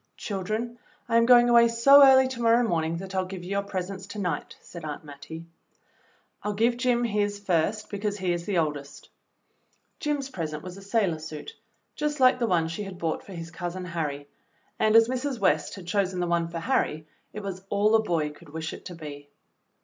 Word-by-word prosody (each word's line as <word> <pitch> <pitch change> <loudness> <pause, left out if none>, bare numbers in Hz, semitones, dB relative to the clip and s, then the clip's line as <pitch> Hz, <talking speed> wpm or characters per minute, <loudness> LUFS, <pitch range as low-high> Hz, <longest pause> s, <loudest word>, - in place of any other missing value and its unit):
"Children, 215 +4 -3 0.3
I 230 - +3
am 230 0 +4
going 240 -1 +7
away 235 -1 +6
so 275 +5 +7
early 265 -1 +7
to 250 -2 -6
morrow 230 +1 +4
morning 165 -2 0
that 190 +2 -7
I'll 185 -1 0
give 185 -1 -7
you 180 - -7
your 200 0 +1
presents 190 -1 -5
to 205 - -8
night," 175 -7 -3
said 170 - -11
Aunt 150 0 -6
Mattie. 150 +3 -10 1.0
"I'll 210 - -2
give 230 +3 +2
Jim 245 -1 +1
his 205 -2 0
first 200 +2 -1
because 205 0 -2
he 185 -3 0
is 170 0 -5
the 200 -3 0
oldest." 150 -3 -3 0.9
Jim's 290 -3 -2
present 155 - -4
was 180 0 -8
a 195 - -11
sailor 195 -5 0
suit 160 - -8 0.4
just 300 0 -2
like 255 0 +5
the 235 - +1
one 170 -5 +2
she 170 +6 -5
had 195 -3 -7
bought 165 -2 -2
for 195 - -11
his 165 -2 -7
Cousin 175 +2 -5
Harry, 150 -5 -4 0.5
and 215 0 +3
as 225 0 +7
Mrs. 255 +1 -2
West 155 -7 +1
had 190 -3 -10
chosen 190 0 0
the 175 - +1
one 170 -1 +1
for 170 0 -6
Harry, 155 -10 0 0.3
it 210 - -7
was 190 -2 -5
all 205 +2 +2
a 225 - +6
boy 165 -7 -1
could 150 +1 -16
wish 160 +1 -5
it - - -11
to 180 - -7
be. 145 -3 -9
195 Hz, 205 wpm, -26 LUFS, 165-230 Hz, 1.0 s, going